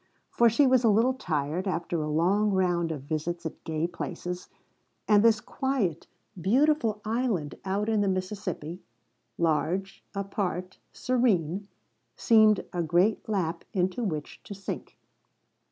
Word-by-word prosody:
For 235 Hz, 0 st, +5 dB
she 255 Hz, +6 st, +4 dB
was 255 Hz, -1 st, +4 dB
a 230 Hz, -, +5 dB
little 230 Hz, +5 st, +4 dB
tired, 160 Hz, -, -2 dB
after 170 Hz, -2 st, -1 dB
a 150 Hz, -, -2 dB
long 185 Hz, +7 st, +2 dB
round 175 Hz, -4 st, +1 dB
of 145 Hz, -4 st, -5 dB
visits 165 Hz, +3 st, -3 dB
at 160 Hz, -, -6 dB
gay 160 Hz, 0 st, -1 dB
places, 175 Hz, +1 st, -5 dB, 0.6 s
and 210 Hz, -2 st, +6 dB
this 225 Hz, -2 st, +5 dB
quiet, 230 Hz, -, -2 dB, 0.3 s
beautiful 235 Hz, -, +2 dB
island 215 Hz, -, -1 dB
out 200 Hz, +2 st, -1 dB
in 220 Hz, -2 st, +2 dB
the 200 Hz, -, +1 dB
Mississippi 185 Hz, -3 st, -3 dB, 0.6 s
large, 170 Hz, +4 st, 0 dB
apart, 190 Hz, -2 st, -3 dB
serene 205 Hz, -7 st, 0 dB, 0.5 s
seemed 215 Hz, -2 st, +4 dB
a 175 Hz, -, 0 dB
great 175 Hz, +7 st, +1 dB
lap 175 Hz, -5 st, -1 dB
into 185 Hz, +4 st, 0 dB
which 155 Hz, -8 st, -4 dB
to 200 Hz, -, -7 dB
sink. 195 Hz, -, -7 dB
190 Hz, 135 wpm, -28 LUFS, 170-215 Hz, 0.6 s, and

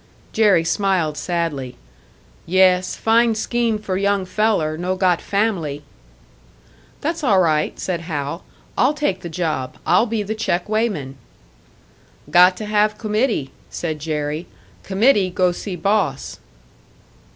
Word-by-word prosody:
Jerry 205 Hz, -6 st, +4 dB
smiled 180 Hz, -4 st, 0 dB
sadly. 160 Hz, -7 st, -3 dB, 0.7 s
"Yes, 185 Hz, 0 st, +3 dB
fine 230 Hz, 0 st, +3 dB
scheme 230 Hz, 0 st, 0 dB
for 195 Hz, -3 st, -3 dB
young 200 Hz, -1 st, +1 dB
feller 185 Hz, -5 st, 0 dB
no 180 Hz, +3 st, -2 dB
got 185 Hz, -2 st, +2 dB
family!" 180 Hz, -9 st, -1 dB, 1.2 s
"That's 325 Hz, +1 st, -2 dB
all 205 Hz, -8 st, +4 dB
right," 155 Hz, -4 st, +1 dB
said 175 Hz, -3 st, -2 dB
Hal, 155 Hz, 0 st, -4 dB, 0.3 s
"I'll 275 Hz, +4 st, +2 dB
take 290 Hz, -11 st, -1 dB
the 170 Hz, -, -6 dB
job 160 Hz, -6 st, -3 dB
I'll 235 Hz, -, +3 dB
be 220 Hz, -2 st, -1 dB
the 210 Hz, +2 st, -3 dB
check 180 Hz, -4 st, -1 dB
weighman." 205 Hz, -, -2 dB, 1.1 s
"Got 180 Hz, +1 st, +6 dB
to 215 Hz, -, -5 dB
have 210 Hz, 0 st, +1 dB
committee," 215 Hz, -, -1 dB, 0.2 s
said 160 Hz, -3 st, -4 dB
Jerry 150 Hz, +1 st, -3 dB, 0.3 s
"committee 200 Hz, 0 st, +2 dB
go 180 Hz, 0 st, +1 dB
see 180 Hz, +2 st, -6 dB
boss." 195 Hz, -7 st, -1 dB
185 Hz, 125 wpm, -20 LUFS, 165-215 Hz, 1.2 s, Got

